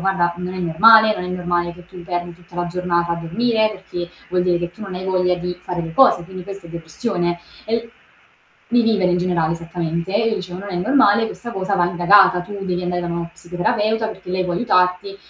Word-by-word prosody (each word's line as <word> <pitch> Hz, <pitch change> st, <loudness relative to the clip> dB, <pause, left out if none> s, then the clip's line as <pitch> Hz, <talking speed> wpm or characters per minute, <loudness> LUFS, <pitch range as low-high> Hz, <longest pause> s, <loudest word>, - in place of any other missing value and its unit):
"Guarda 175 Hz, -2 st, +1 dB
non 180 Hz, +1 st, -5 dB
è -, -, -5 dB
normale, 215 Hz, +6 st, +6 dB
non 180 Hz, -, -5 dB
è -, -, -5 dB
normale 175 Hz, -1 st, -1 dB
che 175 Hz, 0 st, -15 dB
tu 185 Hz, 0 st, -15 dB
im 175 Hz, -, -9 dB
perdi 175 Hz, -1 st, -4 dB
tutta 175 Hz, 0 st, -20 dB
la 175 Hz, 0 st, -2 dB
giornata 175 Hz, -1 st, -1 dB
a -, -, -2 dB
dormire, 220 Hz, +6 st, +1 dB
perché 180 Hz, -3 st, -7 dB, 0.2 s
vuol 180 Hz, 0 st, +1 dB
dire 175 Hz, -1 st, +2 dB
che 175 Hz, 0 st, -4 dB
tu 195 Hz, +5 st, -13 dB
non 195 Hz, -3 st, -6 dB
hai 185 Hz, -, -5 dB
voglia 180 Hz, -1 st, +1 dB
di 180 Hz, 0 st, -4 dB
fare 180 Hz, -1 st, -4 dB
le 165 Hz, -1 st, -6 dB
cose, 265 Hz, -9 st, +5 dB
quindi 185 Hz, 0 st, -9 dB
questa 195 Hz, -2 st, -8 dB
è -, -, -13 dB
depressione 175 Hz, +1 st, -3 dB, 0.3 s
e" 230 Hz, +1 st, -2 dB, 0.8 s
di 240 Hz, 0 st, +4 dB
vivere 210 Hz, -5 st, +2 dB
in 175 Hz, -, +2 dB
generale, 175 Hz, -3 st, 0 dB
esattamente. 170 Hz, +2 st, -4 dB
E 225 Hz, +2 st, +2 dB
io 220 Hz, -, 0 dB
dicevo: 180 Hz, 0 st, -6 dB
"Non 200 Hz, -, -7 dB
è 180 Hz, -, -3 dB
normale, 225 Hz, +1 st, +3 dB
questa 235 Hz, +1 st, -7 dB
cosa 195 Hz, -2 st, -2 dB
va 175 Hz, -2 st, +2 dB
indagata, 180 Hz, +1 st, +5 dB
tu 200 Hz, +3 st, -8 dB
devi 180 Hz, -2 st, -2 dB
andare 175 Hz, 0 st, -1 dB
da 175 Hz, -, -4 dB
uno 170 Hz, 0 st, -4 dB
psicoterapeuta 215 Hz, +6 st, -1 dB
perché 200 Hz, -, -9 dB
lei 185 Hz, 0 st, 0 dB
può 180 Hz, -, -2 dB
aiutarti," 180 Hz, -1 st, +1 dB
180 Hz, 225 wpm, -20 LUFS, 175-200 Hz, 0.8 s, normale